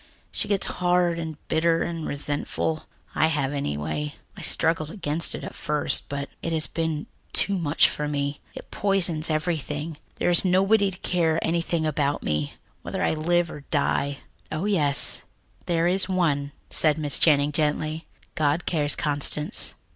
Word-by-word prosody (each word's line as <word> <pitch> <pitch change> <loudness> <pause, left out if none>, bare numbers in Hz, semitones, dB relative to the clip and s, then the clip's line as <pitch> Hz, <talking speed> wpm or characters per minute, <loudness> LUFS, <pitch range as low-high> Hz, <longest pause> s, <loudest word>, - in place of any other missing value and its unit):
She - - -2
gets 200 -2 +1
hard 175 -1 +1
and 160 -2 -5
bitter 165 +1 +2
and 165 -2 -4
resentful 145 +2 -3 0.3
I 160 - +3
have, 145 -3 -1
anyway. 75 - -3 0.2
I - - -9
struggled 160 -2 +1
against 165 -4 +1
it - - -7
at - - -6
first, 150 0 -1
but 140 0 -3
it 165 - -3
has 160 -1 +1
been 160 -2 -2 0.3
too 200 - +2
much 155 -2 +3
for 150 - -3
me. 145 0 -2 0.2
It - - -10
poisons 175 -6 +3
everything. 155 -1 -2 0.2
There - - +1
is 175 - +5
nobody 195 +3 +3
to 185 - -9
care 165 -3 +1
anything 170 -1 0
about 145 -1 0
me, 75 -1 -2 0.3
whether - - -3
I - - +2
live 170 +2 +1
or 150 - -8
die." 140 -1 0 0.3
"Oh, 155 +5 -2
yes, 145 -10 +2 0.5
there 170 -1 +2
is 190 +1 +2
One," 150 -6 +1 0.2
said 155 -1 +3
Miss 150 -3 +6
Channing 145 -2 +4
gently. 155 +1 -1 0.3
"God 155 +1 0
cares, 150 -4 +1
Constance." 150 0 +1
155 Hz, 155 wpm, -25 LUFS, 145-170 Hz, 0.5 s, Miss